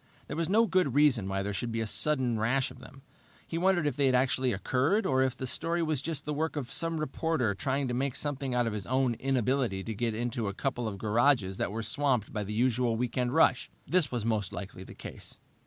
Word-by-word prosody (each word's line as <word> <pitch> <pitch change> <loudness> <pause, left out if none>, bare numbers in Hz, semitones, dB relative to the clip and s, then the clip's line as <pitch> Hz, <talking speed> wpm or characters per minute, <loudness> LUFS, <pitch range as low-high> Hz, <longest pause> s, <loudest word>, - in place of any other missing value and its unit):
There - - -6
was 165 +1 -1
no 225 +4 +4
good 185 - +1
reason 130 -10 +3
why 95 0 -1
there 100 +1 -3
should 115 +5 -3
be 115 - -2
a 115 - -1
sudden 125 -1 +2
rash 125 +4 +1
of - - -13
them. 135 - -14 0.4
He 165 - -3
wondered 180 -3 +2
if 145 - 0
they 140 -2 +2
had 130 - +3
actually 130 0 +2
occurred, 130 - +1
or 130 -1 +2
if 130 -1 0
the 130 - -4
story 165 +6 0
was 155 -4 0
just 155 -1 -2
the 150 - -2
work 160 +2 -2
of 130 -6 -4
some 165 -1 0
reporter 155 -5 0
trying 135 +6 -1
to 120 - -2
make 130 +1 -1
something 140 -3 -3
out 120 -1 +2
of 115 - -2
his 105 -3 -5
own 130 -1 +2
inability 130 -6 0
to 110 - -4
get 115 +1 -1
into 115 -1 -2
a 100 - -4
couple 125 -3 -2
of 100 -2 -4
garages 110 -2 +2
that - - -1
were 115 +2 -3
swamped 125 -1 0
by 105 -2 -2
the 100 - -6
usual 120 +1 +1
weekend 125 +1 -1
rush. 160 -5 +3 0.2
This 175 -5 +1
was 120 -3 -2
most 110 -5 0
likely 95 -1 -7
the - - -12
case. - - -8
130 Hz, 240 wpm, -29 LUFS, 115-145 Hz, 0.4 s, no